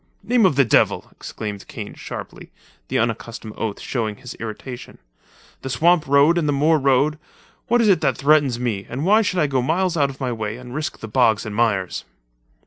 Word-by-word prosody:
"Name 230 -1 +4
of 140 - 0
the 140 0 +4
Devil!" 110 - +2
exclaimed 105 -2 -7
Kane 120 -9 -7
sharply, - - -9 0.4
the - - -1
unaccustomed 115 -1 -3
oath 110 -3 -4
showing 110 -5 -3
his 125 0 -9
irritation; 115 +3 -7 0.6
"the 135 - -5
swamp 165 +4 +3
road 140 +5 +4
and 150 -3 0
the - - +2
moor 155 +3 +3
road—what 150 - 0
is 225 - +3
it 195 -3 +4
that 135 -4 +1
threatens 140 -4 +3
me 110 -6 -2
and 135 +6 -3
why 210 +4 +5
should 200 -4 -1
I 155 - +3
go 135 -3 0
miles 175 +6 0
out 140 -3 +2
of 135 - -10
my 130 -3 -2
way 110 -1 -4
and 125 -1 -10
risk 155 +2 -4
the 110 - -6
bogs 110 -2 +2
and 105 -1 -5
mires?" 105 -5 0
135 Hz, 195 wpm, -21 LUFS, 115-155 Hz, 0.6 s, why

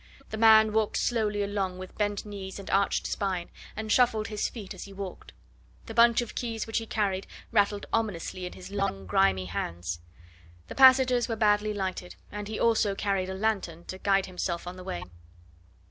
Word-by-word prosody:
The 220 - -3
man 220 -1 +6
walked 220 -1 +1
slowly 210 -4 0
along 195 -2 -2
with 185 0 -9
bent 205 -1 -1
knees 195 -2 -7
and 200 - -7
arched 195 +1 +2
spine, 190 -3 -2 0.2
and 220 0 -4
shuffled 225 -3 +3
his 210 -1 -1
feet 210 -5 -8
as - - -8
he 200 - -11
walked; 195 -1 -7 0.5
the - - -7
bunch 235 0 +5
of 240 - -6
keys 230 -3 -3
which 225 +1 -1
he 225 - -8
carried 195 -4 -1 0.2
rattled 205 -2 +2
ominously 185 -4 -2
in - - -9
his 185 +1 -10
long, 195 - -2
grimy 95 0 +2
hands; 85 -1 -4 0.7
the - - -5
passages 260 -2 +6
were 225 - -2
badly 210 -1 +2
lighted, 190 -3 -4 0.2
and 210 0 -5
he 215 0 -4
also 220 -3 +2
carried 195 -2 -1
a 190 - -4
lanthorn 190 -5 -1
to 185 - -7
guide 195 -1 +2
himself 180 -1 -3
on 180 +1 -6
the 185 - -9
way. 90 - -4
205 Hz, 185 wpm, -28 LUFS, 185-220 Hz, 0.7 s, man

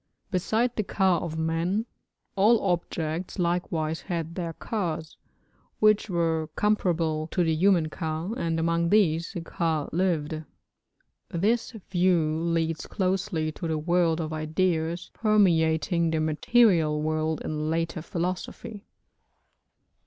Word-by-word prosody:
Beside 220 +6 0
the 215 - 0
ka 190 -3 +2
of 160 -2 -5
man, 165 +7 0 0.5
all 215 +3 +5
objects 170 0 -3
likewise 170 -3 -1
had 165 -3 -4
their 170 -2 -4
kas, 165 -6 -4 0.6
which 215 0 +4
were 165 -3 0
comparable 170 -7 +1
to 180 +2 0
the 160 -1 +1
human 170 0 +3
ka, 160 +4 -4
and 165 -8 -1
among 170 +1 +1
these 170 -5 +3
the 175 - -4
ka 165 -2 -1
lived. 160 -3 0 0.9
This 225 +8 0 0.2
view 175 -4 +2
leads 165 -1 -1
closely 185 -4 -1
to 165 +2 -5
the 160 -1 0
world 170 +1 +1
of 160 -1 -3
ideas 160 +1 -1
permeating 170 -5 +2
the 160 0 0
material 160 0 +3
world 155 +1 -1
in 155 0 -2
later 165 0 -1
philosophy. 185 +5 -4
170 Hz, 120 wpm, -26 LUFS, 160-185 Hz, 0.9 s, all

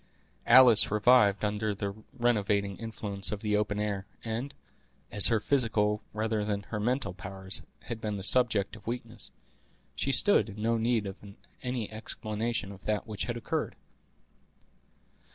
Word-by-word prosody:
Alice 125 -4 +7
revived 105 -1 +4
under 105 0 -1
the 100 0 -4 0.2
renovating 105 -4 +1
influence 105 -3 -4
of 105 -1 -4
the 105 -1 0
open 105 0 0
air, 100 -2 -3 0.2
and, 120 +5 -4 0.6
as 100 - +6
her 115 -2 +2
physical 105 -4 +1
rather 110 0 -1
than 100 -1 -2
her 105 +1 -5
mental 120 -3 -1
powers 95 +1 -3 0.2
had 115 -1 -7
been 105 -2 -3
the 95 - -7
subject 110 -2 +4
of - - -16
weakness, 115 -2 -5 0.7
she 135 - -1
stood 200 - +4
in 105 +1 -9
no 115 +1 +2
need 115 -1 +1
of 95 0 -6 0.4
any 125 -4 -3
explanation 110 0 -3
of 95 -1 -13
that 105 -1 -1
which 105 -3 -4
had 120 +1 -3
occurred. 115 - -3
105 Hz, 150 wpm, -29 LUFS, 100-115 Hz, 0.7 s, Alice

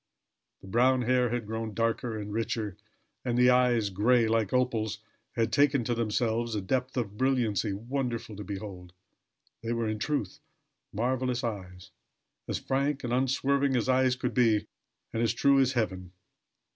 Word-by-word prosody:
The - - -12
brown 125 +5 +3
hair 125 0 +2
had 120 -1 -2
grown 110 0 -4
darker 115 0 -1
and 105 -1 -6
richer, 110 -3 -2 0.5
and 120 -2 -1
the 125 0 +6
eyes, 120 -5 +3
gray 115 +4 +3
like 110 -2 +1
opals, 115 -5 0 0.4
had 115 -1 0
taken 140 -3 +3
to 120 - -1
themselves 115 0 0
a 105 - -1
depth 130 +5 -1
of 105 -4 -2
brilliancy 120 -5 +1
wonderful 120 0 -3
to 105 - -6
behold. 95 -3 -7 0.7
They 115 +1 -2
were, 115 -1 -1
in 110 0 -2
truth, 115 -5 -2 0.5
marvelous 125 +2 -1
eyes; 95 -5 -6 0.6
as - - -1
frank 140 +1 -1
and 120 -1 -2
unswerving 135 +1 +1
as 120 - 0
eyes 130 0 +3
could 125 - -3
be, 115 -4 +3 0.5
and 115 - -1
as 115 0 +2
true 140 +2 +4
as 130 -1 +3
heaven. 95 -7 -2
115 Hz, 160 wpm, -29 LUFS, 105-125 Hz, 0.7 s, the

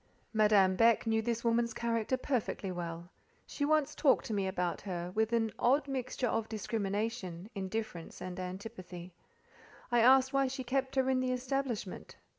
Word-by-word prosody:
Madame 210 -3 +5
Beck 230 +4 +4
knew 220 0 +2
this 235 0 -2
woman's 235 0 +1
character 235 +1 0
perfectly 240 -7 -2
well. 170 0 -6 0.3
She 285 - -2
once 305 -2 +2
talked 275 -4 +3
to 220 - -3
me 200 -2 0
about 180 -2 -2
her, 180 -2 -4
with 220 +2 +1
an 225 -2 +1
odd 275 +4 +3
mixture 260 -1 -2
of 225 -1 -1
discrimination, 210 -3 -3
indifference, 195 -3 -5
and 185 0 -6
antipathy. 185 -2 -7 0.8
I 240 - +4
asked 260 +3 +6
why 275 0 +3
she 260 0 -4
kept 265 +1 -1
her 265 -1 +2
in 260 -1 +2
the 255 0 0
establishment. 255 -5 -3
225 Hz, 160 wpm, -32 LUFS, 190-255 Hz, 0.8 s, asked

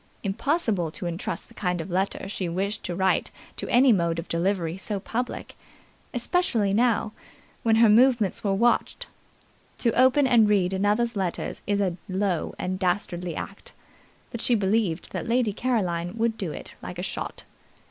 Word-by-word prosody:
Impossible 205 - 0
to 165 - -7
entrust 170 +1 -4
the - - -18
kind 180 -2 -1
of 165 +3 -5
letter 190 +1 -1
she 190 -3 -3
wished 195 +5 -2
to 175 - -3
write 190 +1 +1 0.3
to - - -6
any 250 0 +6
mode 170 -3 +1
of 165 - -5
delivery 170 -1 0
so 200 +1 -4
public 240 +5 -4 0.6
especially 240 - +1
now, 225 -1 +2 0.5
when 225 -1 +3
her 230 0 +6
movements 230 -2 +4
were 200 - +1
watched. 235 +4 +1 0.7
To 235 - +1
open 260 +4 +4
and 235 -5 +5
read 190 -3 +2
another's 210 +5 +1
letters 190 -4 -3
is 205 0 +1
a 185 -3 0
low 185 -3 -1
and 185 +1 -3
dastardly 180 -2 -1
act, 195 - -8 0.6
but 235 - -4
she 245 - +3
believed 200 -4 0
that - - -4
Lady 235 -3 +2
Caroline 185 -6 -1
would 230 0 +1
do 185 -7 -4
it - - -8
like 180 - -7
a 180 - -4
shot. - - -5
200 Hz, 165 wpm, -26 LUFS, 180-230 Hz, 0.7 s, any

